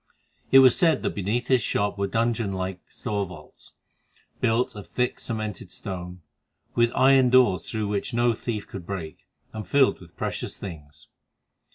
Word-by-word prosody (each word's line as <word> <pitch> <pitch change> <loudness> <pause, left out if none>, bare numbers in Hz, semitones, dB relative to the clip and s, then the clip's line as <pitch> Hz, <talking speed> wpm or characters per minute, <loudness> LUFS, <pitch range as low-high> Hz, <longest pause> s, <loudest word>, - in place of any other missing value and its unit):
It 135 - +8
was 125 - +6
said 160 -5 +3
that - - 0
beneath 105 +5 -1
his 130 -2 +3
shop 100 -1 0
were 100 - +1
dungeon 115 -1 0
like 95 0 -3
store 105 -4 -3
vaults, 85 -4 -13 0.7
built 115 +2 +1
of 105 - -9
thick 125 0 -1
cemented 110 -4 -4
stone, 90 -1 -7 0.5
with 120 0 +3
iron 130 -1 +5
doors 125 -7 +4
through 110 -2 -2
which 100 -1 -2
no 120 0 +2
thief 110 -2 -4
could 90 -3 -9
break, 85 -6 -6 0.3
and 110 -1 -6
filled 140 -7 +3
with 85 -2 -16
precious - - -4
things. 75 -6 -10
105 Hz, 160 wpm, -25 LUFS, 95-120 Hz, 0.7 s, It